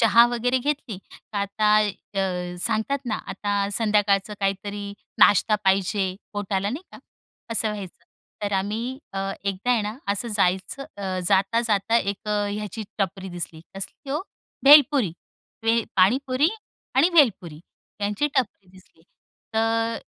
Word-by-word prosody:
चहा 235 +1 +7
वगैरे 245 +1 0
घेतली. 270 -7 -3 0.3
तर 210 - -4
आता 210 +1 +2 0.4
अ, 180 -2 -2
सांगतात 225 +6 0
ना, 215 - 0
आता 205 -1 -1
संध्याकाळचं 210 -2 +2
काहीतरी 200 +1 -2 0.3
नाश्ता 210 +1 +5
पाहिजे. 190 0 +1 0.2
पोटाला 200 -1 -1
नाही 280 +9 -5
का? - - -11 0.5
असं 225 -1 +1
व्हायचं. 190 -4 -8 0.4
तर 205 - -1
आम्ही 220 +7 -2
अ, 195 - -3 0.3
एकदा 200 +4 -1
आहे 235 -3 +3
ना 210 +2 -4
असं 205 +4 -1
जायचं 190 +8 0
अ, 190 -2 -3
जाता-जाता 220 +2 +2
१ 200 0 -4
ह्याची 210 0 -2 0.2
टपरी 190 0 -2
दिसली. 175 -2 -6
कसली 235 +8 -7
हो? 300 - 0 0.4
भेलपुरी 280 - +7 0.5
भेल 225 0 +2
पाणीपुरी 255 - +3 0.5
आणि 275 +6 +5
भेलपुरी 190 - +3 0.4
यांची 205 +7 0
टपरी 210 -7 -1
दिसली. 185 -3 -20 0.5
तर 225 +1 +1
अ, - - -5
205 Hz, 130 wpm, -24 LUFS, 195-235 Hz, 0.5 s, चहा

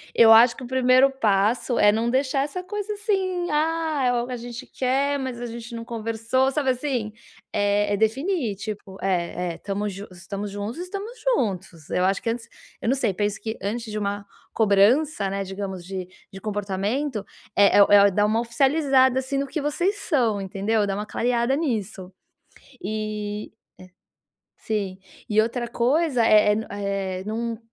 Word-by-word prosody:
Eu 225 -1 +8
acho 230 +2 +6
que - - -8
o - - -6
primeiro 255 +1 +4
passo 225 -1 +1
é 205 - +6
não 225 +3 0
deixar 270 +1 +1
essa 295 +6 -4
coisa, 415 +2 -4
assim: 380 -4 -1
"Ah, 315 -1 0
é - - +3
o 240 +1 -1
a 250 - -3
gente 240 +2 -8
quer, 275 +2 0
mas 260 -3 -4
a - - -3
gente 235 0 -8
não 230 0 -6
conversou", 230 +3 0
sabe 275 -2 +1
assim. 250 -5 -2 0.4
É 205 0 +1
é - - +1
definir, 245 - 0
tipo, 200 -2 -7
eh 180 -2 -1
eh, - - -12
tamos 200 0 -3
jun 200 +2 -8
estamos 195 +3 -6
juntos, 205 +6 -5
estamos 395 +5 -5
juntos. 190 - -2
Eu 180 - +1
acho 195 +1 +1
que, - - -2
antes 230 0 -4 0.3
eu - - -1
não 265 - +3
sei, 260 -7 0
penso 205 +2 -1
que 220 0 -4
antes 225 +3 -3
de 210 - -3
uma 200 0 -3 0.3
cobrança, 215 +3 +3
né, 195 0 -2
digamos, 190 -2 -6
de 185 -1 -6 0.2
de 195 - -9
comportamento, 210 +4 -2 0.3
eh 200 -1 +5
eh 200 - +9
eh, 200 0 +7
dar 205 +2 +2
uma 220 +2 +1
oficializada, 265 +1 +3
assim, 265 +1 -3
no 280 - -1
que 305 +3 -3
vocês 345 +8 0
são, 240 - 0
entendeu, 205 +2 0
dá 195 - -1
uma 210 +1 -3
clareada 240 +3 0
nisso. 215 - -3 0.7
E 210 -1 -4
eh - - -43 1.0
sim. 200 -4 -3 0.3
E 215 0 +4
outra 240 +2 -2
coisa, 255 +2 +1
eh 210 -1 +5
eh - - +2
n 220 - -3
eh, 195 -2 -3
não 230 +1 -3
225 Hz, 175 wpm, -24 LUFS, 205-265 Hz, 1.0 s, eh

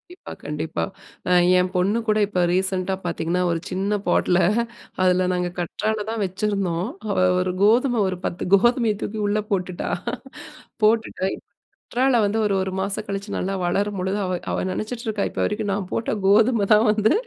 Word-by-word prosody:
கண்டிப்பா, - - -11
கண்டிப்பா. - - -3 0.5
அ - - +2 0.3
ஏன் 180 0 +2
பொண்ணு 195 +5 +2
கூட 215 0 +3
இப்ப 180 -3 0
ரீசென்ட்டா 190 0 0
பாத்தீங்கன்னா, 170 +1 -1
ஒரு 165 - 0
சின்ன 200 +3 0
பாட்ல 180 0 +3 0.6
அதுல 185 0 +3
நாங்க 180 0 -1
கற்றாழை 210 +5 -2
தான் 225 -2 -3
வெச்சிருந்தோம். 190 -1 -1 0.2
அவ 200 - -1 0.2
ஒரு 180 0 -1
கோதுமை 240 +3 +4
ஒரு 185 - -4
பத்து 180 +1 -3
கோதுமைய 235 0 +3
தூக்கி 215 +1 -4
உள்ள 210 +1 +1
போட்டுட்டா, 185 -2 -2 0.9
போட்டுட்டு 215 -3 +1 0.6
கற்றாழை 255 -1 +3
வந்து, 205 +2 0
ஒரு 200 - +1
ஒரு 190 0 -3
மாசம் 200 +2 -2
கழிச்சு 200 +1 -5
நல்லா 195 +1 -2
வளரும்பொழுது, 195 +1 -1
அவ 185 - -1 0.2
அவ - - -1
நெனச்சிட்டுருக்கா, 220 0 -3
இப்ப - - -5
வரைக்கும் 210 -1 -1
"நா - - +1 0.2
போட்ட 225 - -1 0.2
கோதுமை 215 +2 +4
தான் 215 +2 +4
வந்து 215 0 +2
200 Hz, 155 wpm, -23 LUFS, 185-215 Hz, 0.9 s, கோதுமை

